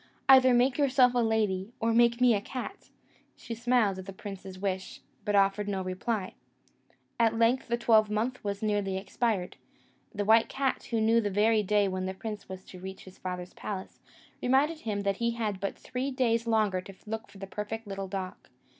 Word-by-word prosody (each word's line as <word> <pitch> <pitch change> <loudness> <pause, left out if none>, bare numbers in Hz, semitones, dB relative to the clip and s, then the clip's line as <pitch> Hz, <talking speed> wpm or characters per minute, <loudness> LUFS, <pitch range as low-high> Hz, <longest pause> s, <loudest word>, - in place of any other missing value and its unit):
Either 260 -1 +8
make 250 +3 +3
yourself 260 -3 +4
a 245 - +2
lady, 220 -3 0
or 225 0 +1
make 235 0 +4
me 250 -2 +5
a 205 - 0
cat." 260 - -7 0.5
She 235 - -7
smiled 230 -4 +1
at 190 - -9
the - - -5
prince's 190 -1 -8
wish, 190 -1 -3 0.2
but 205 - 0
offered 200 +1 +3
no 195 -2 -2
reply. 185 +2 -3 0.9
At 225 -1 +3
length, 235 +3 +2
the 235 -1 0
twelvemonth 220 +1 +2
was 200 0 -3
nearly 205 -3 0
expired: 200 -1 -2 0.5
the 205 -1 -3
white 225 +2 +5
cat, 270 -1 -1
who 230 - -1
knew 225 +1 +4
the 205 - -1
very 215 +2 +3
day 205 0 +2
when 185 0 -2
the 190 - -4
prince 210 -1 -7
was 190 0 -8
to 185 - -11
reach 190 +1 -8
his 185 0 -14
father's 180 -1 -5
palace, 190 -2 -6 0.4
reminded 285 +6 +2
him 210 -7 -3
that 200 -1 0
he 235 0 0
had 215 -4 -2
but 195 +1 -3
three 255 +2 -3
days 235 -3 +1
longer 215 -5 +2
to 195 +1 -12
look 220 0 -5
for 200 - -15
a 195 - -6
perfect 210 +3 -5
little 195 -1 -5
dog. 190 0 -6
210 Hz, 190 wpm, -29 LUFS, 195-235 Hz, 0.9 s, Either